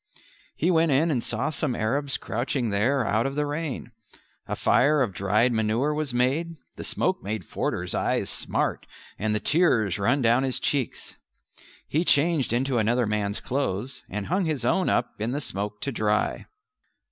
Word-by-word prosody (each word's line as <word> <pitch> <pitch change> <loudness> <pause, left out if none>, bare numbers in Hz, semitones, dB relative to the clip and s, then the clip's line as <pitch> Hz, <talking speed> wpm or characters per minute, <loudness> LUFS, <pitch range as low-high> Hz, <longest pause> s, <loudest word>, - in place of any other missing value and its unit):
He 175 +4 +1
went 165 -2 +3
in 155 +5 +3
and 125 -5 0
saw - - -1
some 140 -4 -1
Arabs 135 +6 0
crouching 120 +1 -2
there 120 +6 +1
out 110 +5 +1
of 135 - -5
the 150 0 0
rain. 145 -5 -4 0.6
A - - -2
fire 145 +1 +3
of 110 -6 -3
dried 105 +6 +2
manure 115 +6 +1
was 150 -2 -1
made; 135 +8 0 0.2
the - - -7
smoke - - 0
made 105 +2 -4
Forder's - - -2
eyes - - 0
smart - - -1 0.3
and 105 0 0
the - - +2
tears 115 - +2
run 130 +7 +2
down 120 +2 +4
his 130 -1 0
cheeks. 140 -5 -2 0.7
He 160 +4 +1
changed 155 -3 +3
into 125 +1 +1
another 120 +3 +2
man's 105 -1 -1
clothes, 130 -2 -3
and 105 0 -4
hung 185 +2 0
his 155 -4 -1
own 190 -1 +2
up - - +1
in 115 +4 -1
the 145 - -1
smoke 105 -4 -4
to 140 - -2
dry. 105 -3 0
125 Hz, 170 wpm, -26 LUFS, 110-145 Hz, 0.7 s, down